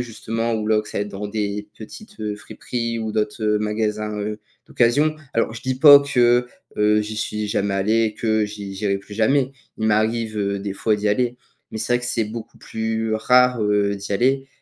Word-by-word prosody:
justement, 115 0 -3
ou 110 -1 -2
là 110 0 +3
que 105 - -12
ça - - -3
ait - - 0
dans 105 0 -6
des 105 0 -3
petites, 160 - -11
heu, 105 -1 -2
friperies 115 +2 -4
ou 110 -1 -3
d'autres, 105 +1 -2
heu, 105 0 +2
magasins, 105 0 -2
heu, 105 +1 -4 0.3
d'occasion. 145 +6 +2 0.2
Alors, 115 - +1
heu, - - -9
je 115 - -7
dis 130 0 -1
pas 145 0 +10
que, 125 -3 +3 0.3
heu, 105 0 +3
j'y 105 +1 -5
suis 105 0 -2
jamais 100 -1 0
allé, 110 +4 +2
et 110 -1 0
que 110 -1 +1
j'i 105 -2 -7
j'irai 100 -1 -1
plus 105 +1 -12
jamais! 130 +5 +2 0.3
Il 110 - 0
m'arrive, 110 +1 +1
heu, 100 -1 -1
des 100 0 -4
fois, 105 +1 +1
d'y 105 0 -1
aller. 120 +3 0 0.3
Mais 110 - -5
c'est 120 - -1
vrai 120 - +1
que 120 - -4
c'est 115 - 0
beaucoup 110 +1 -8
plus 110 0 -2
rare, 125 +1 +3
heu, 105 -1 +1
d'y 100 +1 -6
aller, 135 +6 +1
110 Hz, 215 wpm, -22 LUFS, 105-115 Hz, 0.3 s, pas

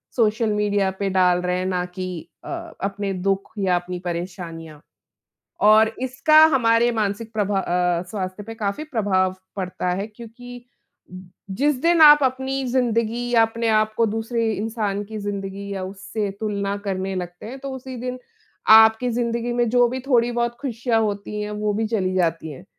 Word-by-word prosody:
Social 220 -1 +2
media 205 -2 +1
पे 200 -1 0
डाल 180 -1 +3
रहे 180 0 -1
हैं, 185 - -2
ना 180 -1 -1
कि 180 -2 -7
अ, - - -9 0.3
अपने 195 0 -2
दुख 195 +1 -1
या 190 -3 +1
अपनी 175 +1 -3
परेशानियाँ। 170 -3 -6 0.8
और 215 +1 +6
इसका 275 +4 +3 0.2
हमारे 230 -1 +3
मानसिक 220 0 -2
प्रभा 205 -2 0
अ, 180 -1 0
स्वास्थ्य 185 -1 -4
पे 225 +2 -8
काफ़ी 215 +6 -3
प्रभाव 195 -9 0 0.2
पड़ता 180 -1 -3
है 200 - -3
क्योंकि, 240 +2 -12 0.9
जिस 280 +9 +1
दिन 335 0 +3
आप 295 -1 +9
अपनी 265 +1 -1
ज़िंदगी 240 -1 0
या 235 -2 +5
अपने 230 +1 -1
आपको 215 +1 +2
दूसरे 225 +1 -1
इंसान 210 -2 -2
की 215 +1 -7
ज़िंदगी 200 -1 -5
या 190 -1 -4
उससे 195 +2 -4
तुलना 200 -2 -2
करने 190 -1 -2
लगते 180 +1 -6
हैं, 255 +4 -7
तो 275 0 -6
उसी 260 0 -8
दिन 250 +1 -4 0.5
आपकी 220 +2 +7
ज़िंदगी 235 0 -1
में 240 -1 +1
जो 245 0 +4
भी 260 +2 -4
थोड़ी-बहुत 240 -2 +1
खुशियाँ 235 -3 0
होती 210 0 -3
हैं, 210 - -4
वो 210 0 -1
भी 220 +2 0
चली 190 -5 -1
जाती 165 -3 0
हैं 175 +6 -12
215 Hz, 165 wpm, -22 LUFS, 190-235 Hz, 0.9 s, आप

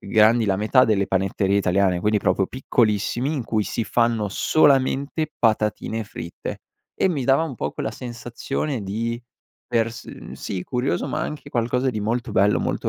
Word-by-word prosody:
uhm, - - -11
grandi 110 +2 +5
la 95 - +2
metà 110 +6 +4
delle 100 -3 +2
panetterie 95 +1 +1
italiane, 95 -1 +2
quindi 105 +2 +2
proprio 95 -1 +1
piccolissimi, 120 +2 0
in 130 - -3
cui 110 -2 0
si 115 - -2
fanno 115 -3 +1
solamente 140 +4 +2
patatine 110 0 +1
fritte, 85 -4 -7 0.3
e - - +2
mi 145 -8 -1
dava 135 +4 +4
un 160 -5 -4
po' - - -3
quella - - -3
sensazione 120 +3 -4
di 115 +4 -3 0.5
per 115 -1 +1
s 115 - -10
sì, 90 -1 -5
curioso, 125 +5 -1
ma, 155 - -2
anche 150 -2 -5
qualcosa 125 +1 0
di 110 -3 -4
molto 115 +2 -2
bello, 100 +2 +3
molto - - -2
115 Hz, 170 wpm, -23 LUFS, 105-130 Hz, 0.5 s, grandi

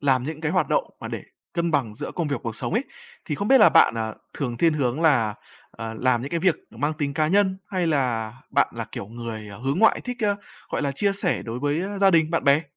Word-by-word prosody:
làm 135 -3 +2
những 155 +3 -5
cái 160 -1 -1
hoạt - - +2
động - - +2 0.2
mà - - -6
để - - -5 0.3
cân 170 -1 0
bằng 130 -9 0
giữa - - -5
công 170 -4 -1
việc, 140 - 0
cuộc 115 -1 -4
sống - - -4
ấy, 240 +5 +1 0.4
thì 150 - -2
không 200 +8 -2
biết 270 - +7
là 215 - +8
bạn, - - +5
à, 110 -1 -3 0.2
thường 125 -4 -3
thiên 165 +6 +3
hướng 140 -1 0
là, 120 -10 +3 0.4
à, 115 0 -6
làm 130 -2 +2
những 140 - -5
cái 170 - -1
việc 180 -1 +4 0.2
mang 145 +8 -1
tính 145 -2 -2
cá 155 0 +2
nhân, 190 +1 +3
hay 185 -3 0
là 125 -8 0 0.2
bạn - - +3
là - - -3
kiểu - - -5
người, 115 -1 -7
ờ, 100 - -10
hướng 135 +6 -1
ngoại 220 +2 +5
thích, 245 -2 -3
a, 205 -1 +3 0.4
gọi - - -1
là, 140 -1 0
chia 200 +8 +1
sẻ 195 -3 0
đối 115 +1 -4
với, 145 +4 0
a, 200 +1 -4
gia 195 0 +5
đình, 160 -3 +3
bạn 165 - 0
bè? 140 +2 +5
145 Hz, 265 wpm, -24 LUFS, 120-175 Hz, 0.4 s, là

